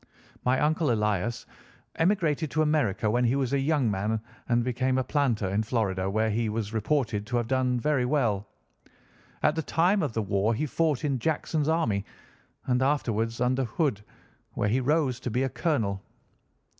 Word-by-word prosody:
"My 125 +1 +2
uncle 155 -2 +2
Elias 105 +1 -1 0.5
emigrated 165 -4 +1
to 155 +2 +1
America 145 -10 +1
when 120 +2 +2
he 120 +3 +2
was 135 -2 -1
a 140 - +2
young 135 -5 +1
man 105 +3 -1 0.3
and 120 0 +3
became 130 +1 0
a 130 - +1
planter 125 -7 0
in 100 +3 +1
Florida, 100 -5 -1
where 110 +2 +1
he 110 +1 0
was 110 0 -3
reported 110 -2 0
to 120 +1 0
have 120 - 0
done 125 0 +1
very 140 0 +1
well. 115 -7 0 1.0
At - - +4
the 160 - -1
time 180 +6 +2
of 145 -8 -2
the 110 - -1
war 100 +3 +1
he 150 - -1
fought 155 -1 0
in 140 -3 0
Jackson's 155 +2 -1
army, 120 -12 +1 0.6
and 125 0 +1
afterwards 115 -5 0
under 130 +2 +1
Hood, 115 - -1 0.5
where 105 - 0
he 120 +5 +2
rose 135 -2 +1
to 125 - -4
be 125 +3 0
a 135 - 0
colonel. 110 - -1
125 Hz, 175 wpm, -27 LUFS, 110-145 Hz, 1.0 s, At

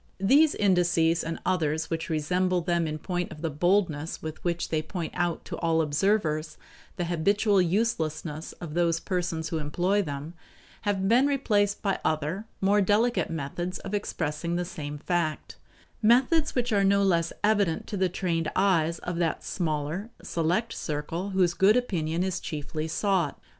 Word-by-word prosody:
These 280 +11 +4
indices 175 -4 +2
and 165 0 -3
others 160 -3 0
which 165 0 -2
resemble 180 +3 +1
them 170 -1 0
in 155 0 -3
point 180 +2 -3
of 155 - -10
the 165 - -1
boldness 165 -1 +1
with 155 0 -7
which 170 -1 -1
they 155 -1 0
point 165 +1 -5
out 175 -2 -1
to - - -6
all 165 -1 +2
observers 155 -1 0 0.4
the 175 - -2
habitual 195 +4 +2
uselessness 165 -5 -1
of 165 -4 -8
those 170 -1 +2
persons 175 -4 -2
who 160 - -2
employ 180 +7 +1
them, 145 -1 -5 0.6
have 195 -1 0
been 245 +6 +5
replaced 210 -8 +1
by 195 -2 0
other, 155 +6 -1 0.2
more 200 +2 +4
dedicate 220 +5 +2
methods 165 +4 -4
of - - -8
expressing 170 -4 -2
the 175 0 -1
same 150 -3 -6
fact; 165 0 -2 0.4
methods 260 +8 +3
which 245 -2 0
are 200 -1 +3
no 200 +1 +4
less 170 -4 +2
evident 205 -6 +2
to - - -5
the 190 -1 +1
trained 170 -3 -1
eyes 170 -4 +2
of 175 0 -5
that 170 -2 -1
smaller, 160 +4 -2
select 175 +8 0
circle 160 +5 -3
whose 185 -3 +2
good 195 +6 +4
opinion 175 -8 -1
is 190 -1 -1
chiefly 155 +1 -4
sought. 190 +1 0
175 Hz, 160 wpm, -27 LUFS, 160-195 Hz, 0.6 s, been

